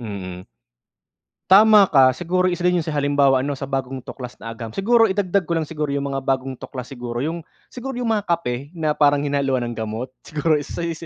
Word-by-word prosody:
Mm. 95 -5 -7 1.1
Tama 210 0 +7
ka. 130 -3 +5
Siguro 180 +6 0
isa 175 - -4
din 180 0 +3
'yun - - -8
sa 155 - -3
halimbawa 140 -2 +3
ano 140 +1 -3
sa 135 - -5
bagong 135 -1 -3
tuklas 125 -2 -8
na 115 - -7
agham. 115 0 -7
Siguro 225 +2 +4
idagdag 195 -1 +1
ko 170 - -1
lang 160 - -1
siguro 150 -1 -4
'yung 140 0 -2
mga 135 0 -2
bagong 135 0 -1
tuklas 125 -2 -8
siguro 120 -2 -6
'yung 165 +3 -3 0.3
siguro 260 +1 -6
'yung 245 -2 -1
mga 210 -2 0
kape 145 -4 -2
na 155 -2 0
parang 145 -1 +3
hinaluan 140 -3 0
ng 120 - -5
gamot, 110 +3 -4 0.2
siguro 155 0 +1
isa 150 +4 -6
yu 170 - -2
si 170 - -9
145 Hz, 210 wpm, -21 LUFS, 130-170 Hz, 1.1 s, Tama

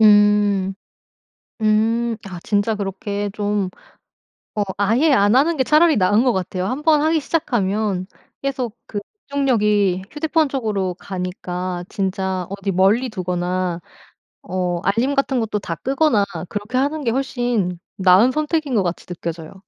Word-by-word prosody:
음 205 -2 +4 0.9
음. 225 +2 +2
아 185 -2 -7
진짜 210 +1 +1
그렇게 200 0 -3
좀 205 -2 -1 0.8
어 210 - 0
아예 230 +10 +3
안 205 -1 +4
하는 315 +4 +3
게 260 - +2
차라리 310 +3 +4
나은 205 +5 +3
것 250 - +3
같아요. 185 -1 -2
한번 300 +6 +2
하기 315 +1 +2
시작하면 210 - -1 0.3
계속 255 -4 -3
그 210 - -4 0.3
집중력이 210 -9 +2
휴대폰 310 0 +1
쪽으로 210 -9 -1
가니까 180 -1 -4
진짜 190 -1 -2
어디 200 0 -3
멀리 200 +8 +3
두거나 180 -3 -2 0.6
어 180 -1 -2
알림 230 +9 +1
같은 275 -2 +1
것도 215 -2 -1
다 170 -4 -4
끄거나 270 - +2 0.2
그렇게 210 +4 -3
하는 285 +2 0
게 230 - +2
훨씬 240 -8 -1 0.2
나은 190 +6 +5
선택인 305 -2 -1
것 205 - +3
같이 175 -1 -3
느껴져요. 165 -2 -6
210 Hz, 270 characters per minute, -20 LUFS, 190-260 Hz, 0.9 s, 나은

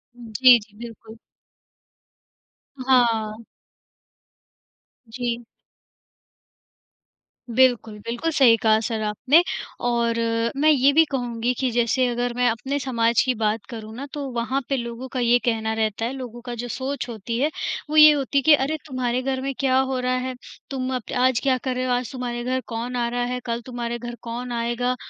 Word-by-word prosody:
जी, 245 +1 +5
जी, 210 -1 -18
बिल्कुल। 225 -1 -10 1.6
हाँ। 230 -4 +2 1.7
जी। 240 0 -3 2.1
बिल्कुल, 235 -3 +2
बिल्कुल, 240 +10 -3
सही 260 -7 +5
कहा 220 -1 +4
सर 225 0 -3
आपने 255 +10 +3 0.4
और 235 -1 +1 0.4
मैं 300 +3 +3
ये 280 -2 +5
भी 325 +2 +6
कहूँगी 245 -2 -1
कि 260 - +1
जैसे 235 +2 +2
अगर 245 0 -1
मैं 250 0 +2
अपने 245 +5 -2
समाज 235 -3 +2
की 255 - +2
बात 215 -1 -1
करूँ 220 -3 -8
ना, 270 +4 -6
तो 290 -1 -4
वहाँ 245 +3 -1
पे 275 - +1
लोगों 235 +1 -5
का 260 - -1
ये 240 0 +4
कहना 220 -2 0
रहता 220 0 -1
है, 240 - -2
लोगों 245 -3 -8
का 245 - -5
जो 240 +1 -5
सोच 260 +2 -4
होती 230 0 -4
है 290 +4 +2 0.4
वो 310 - -1
ये 305 0 +10
होती 280 -1 -1
है, - - +5
कि 305 +3 +6
अरे, 290 +2 +1
तुम्हारे 255 -2 -1
घर 260 0 -2
में 275 +1 -3
क्या 260 -2 +2
हो 265 -1 0
रहा 250 0 0
है? 260 0 -4 0.3
तुम 260 -1 -3
अप 250 - -6
आज 255 -2 +3
क्या 265 -2 +2
कर 260 -2 -2
रहे 255 0 -1
हो, 255 - -1
आज 245 -1 -2
तुम्हारे 245 -2 -4
घर 255 +1 -1
कौन 235 +2 -4
आ 240 -1 0
रहा 245 0 -1
है, 250 - -2
कल 235 0 -2
तुम्हारे 240 -1 -4
घर 240 0 -6
कौन 240 +1 -6
आएगा? 240 +1 -1
245 Hz, 175 wpm, -23 LUFS, 230-260 Hz, 2.1 s, ये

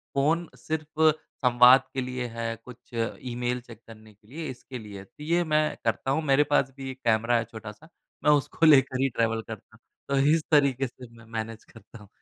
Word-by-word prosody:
Phone 160 +5 +1
सिर्फ़ 155 0 +1 0.3
संवाद 125 +1 +7
के 130 - -1
लिए 125 0 -4
है, 115 0 -4
कुछ 125 -2 -11 0.5
ईमेल 125 +1 -2
चेक 115 -2 -14
करने 110 -1 -14
के 105 +1 -29
लिए, 155 +6 -6
इसके 130 0 -8
लिए 105 -2 -10
है। - - -10
तो 150 - -14
ये 170 +2 +1
मैं 155 -1 +1
करता 115 +4 0
हूँ, 160 +3 0
मेरे 140 0 +4
पास 135 -2 +3
भी 135 -1 -6
एक 130 - -12
कैमरा 115 +1 +3
है 115 - 0
छोटा-सा। 110 +6 -10 0.4
मैं 150 - +5
उसको 145 +3 +2
लेकर 135 -4 +5
ही 135 - +2
ट्रैवल 115 -2 0
करता। 110 -1 -10 0.3
तो 140 - +1 0.2
इस 160 - -2
तरीके 135 -3 +3
से 125 +1 -13
मैं 115 - -15
मैनेज 110 0 -5
करता 115 +1 -15
हूँ। 105 - -15
125 Hz, 200 wpm, -26 LUFS, 115-145 Hz, 0.5 s, संवाद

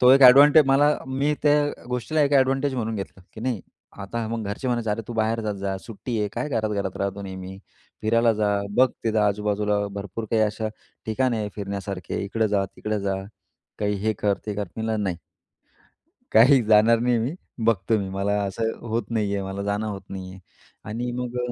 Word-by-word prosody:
तो 125 0 +7
एक 135 +1 +7
एडवांटे 145 +4 +9
मला, 145 +2 +4
मी 140 +3 0
त्या 145 0 +2
गोष्टीला 125 +5 0
एक 140 - +1
एडवांटेज 135 0 +3
म्हणून 115 -2 -2
घेतलं, 95 -2 -7
की 110 - -10
नाही, 120 -5 -1 0.4
आता 110 +3 -4
मग 115 -1 -3
घरचे 100 +6 -3
म्हणायचे, 120 -3 0
"अरे, 105 +2 -1
तू 120 - -4
बाहेर 110 0 0
जात 105 -2 -2
जा, 100 -1 -3
सुट्टी 115 +2 -5
आहे, 105 -1 0
काय 150 - -3
घरात 110 -5 -1
घरात 100 -3 -2
राहतो, 100 0 -3
नेहमी 95 0 -7 0.4
फिरायला 115 +1 +3
जा, 105 -1 0 0.3
बघ 130 +1 +6 0.2
तिथं 110 -1 +1
आजूबाजूला 105 0 +1 0.2
भरपूर 100 +2 -5
काही 110 -1 +3
अशा 110 +1 -1 0.4
ठिकाणे 120 +1 +1
आहेत 105 -1 -3
फिरण्यासारखे, 100 -2 -4
इकडं 110 +2 0
जा, 100 -1 +1
तिकडं 105 -1 -2
जा, 100 -1 -1 0.6
काही 105 -1 0
हे 110 - +3
कर, 100 -2 +1
ते 105 - -2
कर." 105 0 -2
मी 110 - -3
म्हटलं, 110 -1 -1
"नाही. 90 -3 -1 1.2
काही 125 +4 +7
जाणार 110 +2 +5
नाही 120 0 +2
मी, 120 +7 -1 0.3
बघतो 110 0 +2
मी 95 -1 -4
मला 100 +1 -1
असं 110 +3 -1 0.2
होत 115 +2 0
नाही 105 -3 0
आहे, 100 - -2
मला 95 +1 -4
जाणं 100 +2 -1
होत 100 -2 -5
नाही 95 -1 -6
आहे." 95 - -12 0.5
आणि 120 +3 -3
मग 125 0 -4
110 Hz, 195 wpm, -24 LUFS, 100-120 Hz, 1.2 s, एडवांटे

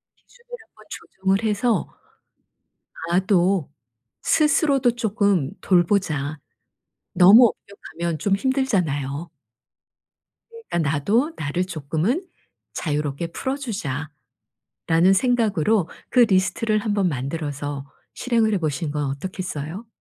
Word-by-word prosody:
기준을 485 0 -26 0.2
한번 - - -21
조정을 195 +3 -2
해서 215 -1 +1 1.2
'나도 185 -3 +2 0.5
스스로도 290 -4 +3
쪼끔 200 - +1
돌보자.' 165 -5 +1 0.7
너무 215 +6 +7 0.5
엄격하면 170 -2 -1
좀 195 +5 +1
힘들잖아요. 175 - -1 1.4
그러니까 160 -4 0
'나도 225 - +1
나를 155 +5 -2
조금은 175 - -2 0.5
자유롭게 150 0 -2
풀어 265 +7 -3
주자.'라는 160 - -6 0.8
생각으로 220 - +2 0.2
그 250 - +4
리스트를 215 +1 +2
한번 205 -3 0
만들어서 145 0 -4 0.3
실행을 230 -3 +1
해 195 - +1
보시는 155 -1 -2
건 150 -1 -2
어떻겠어요? 180 +4 -6
185 Hz, 245 characters per minute, -22 LUFS, 150-225 Hz, 1.4 s, 너무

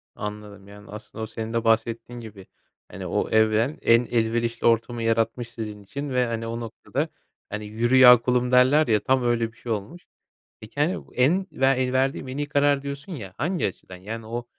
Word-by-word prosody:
Anladım. 105 -1 -8
Yani, 105 0 -14
aslında, 110 +1 -8
o - - -4
senin 115 +1 -6
de 115 0 0
bahsettiğin 115 +1 0
gibi, 105 -4 -11 0.4
hani, - - -7
o - - -1
evren 110 +5 +2
en 115 +1 +4
elverişli 115 0 0
ortamı 115 0 +1
yaratmış 115 +1 0
sizin 105 -3 -7
için 140 +7 -6
ve, 125 -1 +1
hani, 115 -1 -3
o 115 +1 -4
noktada, 115 -2 -4 0.4
hani, 105 0 -5
“Yürü 115 +4 0
ya 125 -1 +10
kulum!” 125 0 +1
derler, 130 +4 +5
ya, 110 -2 +3
tam 130 -1 +2
öyle 115 -1 0
bir 115 - -26
şey 120 - -6
olmuş. 110 - -5 0.6
Peki, 110 +6 -10
hani, 160 +6 0
en 175 +10 +2
ve 135 - 0
el 130 -1 +2
verdiğim 135 0 0
“en 130 +2 -6
iyi 145 - -2
karar” 145 -1 +2
diyorsun, 140 +5 -7
ya, 100 - -8
hangi 170 - 0
açıdan? 95 -1 -9
Yani, 110 +5 -7
o 120 +1 -4
115 Hz, 195 wpm, -24 LUFS, 110-130 Hz, 0.6 s, ya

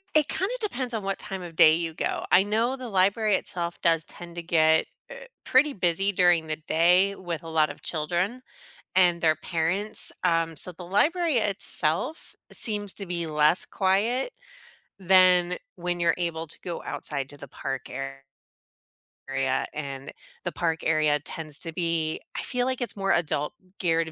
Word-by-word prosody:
It 305 -1 +5
kinda 380 +8 -1
depends 265 - -2
on 220 -3 -2
what 195 0 -2
time 190 -1 -6
of 170 -2 -9
day 155 -1 +8
you 165 0 -1
go. - - -2
I 190 - +6
know 225 +5 0
the 255 -2 -7
library 200 +2 +2
itself 170 -2 -3
does 165 -2 +3
tend 170 +1 -12
to 170 - -5
get, 160 -1 +3 0.2
uh, - - -10 0.2
pretty 275 +3 +4
busy 195 -2 +1
during 175 -4 +3
the 155 0 -3
day 180 +5 +3
with 170 -3 -5
a 165 - -8
lot 155 -1 +2
of - - -10
children 175 +9 -1 0.5
and 175 -2 +4
their 160 -2 +3
parents, 170 +6 -1
um, 165 -2 +1
so 180 - +1
the 180 0 -10
library 315 - +2
itself 205 - -1 0.2
seems 205 -3 +1
to 200 - -7
be 170 -1 -2
less 155 +2 +3
quiet 215 - +1 0.7
than 180 -1 +5 0.2
when 175 0 -2
you're 170 -1 +3
able 165 -2 -2
to - - -9
go 175 -2 -5
outside 140 -3 -4
to 145 - -12
the 140 - -10
park 135 0 -5
ar 135 +1 -6 1.1
area, 135 -1 0
and 140 -2 -6 0.3
the 175 - -2
park 165 -2 -1
area 155 -2 +2
tends 155 -2 -5
to 165 - -5
be 165 -2 -1 0.2
I - - -1
feel 250 -1 -1
like 260 0 -2
it's 245 - -2
more 195 0 0
adult-geared 165 +1 -1
175 Hz, 170 wpm, -26 LUFS, 160-200 Hz, 1.1 s, day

